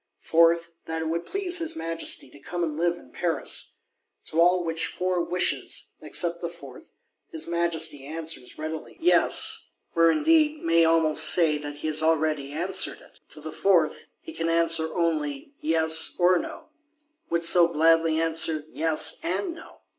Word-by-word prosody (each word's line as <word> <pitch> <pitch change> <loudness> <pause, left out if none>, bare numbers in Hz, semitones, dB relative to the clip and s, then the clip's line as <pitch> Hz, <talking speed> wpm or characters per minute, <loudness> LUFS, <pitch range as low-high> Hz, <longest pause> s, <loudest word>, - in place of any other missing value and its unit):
Fourth, 170 +1 +3
that 160 0 -4
it 160 - -3
would 170 +1 -3
please 370 -3 -1
his 330 -1 -3
Majesty 165 -5 -3
to 145 - -16
come 175 +4 -5
and 155 -3 -3
live 170 +2 0
in - - -17
Paris. 175 -2 -2 0.5
To 165 - 0
all 180 +1 +3
which 165 -1 -1
four 180 -1 -2
wishes, 180 +1 -2
except 170 0 -1
the 170 - -3
fourth, 170 - -14 0.4
his 325 -5 -5
Majesty 165 -4 +1
answers 160 -4 -4
readily, 155 0 -7
Yes; 350 +2 +2 0.3
or 165 0 +5
indeed 310 - +2
may 165 0 +3
almost 160 -1 +3
say 155 -2 +4
that 145 0 -7
he 145 - -10
has 155 0 +2
already 155 -3 0
answered 175 +6 0
it. - - -21
To - - -8
the - - -7
fourth - - +1
he 325 - -11
can 165 - -3
answer 165 -1 +2
only, 155 - -2
Yes 160 0 +1
or 180 0 +3
No; - - -9 0.6
would 170 0 -1
so 170 0 +6
gladly 165 0 +3
answer, 160 -1 +1
Yes 160 0 +1
and 190 - -2
No! 330 - -15
165 Hz, 160 wpm, -25 LUFS, 160-175 Hz, 0.6 s, so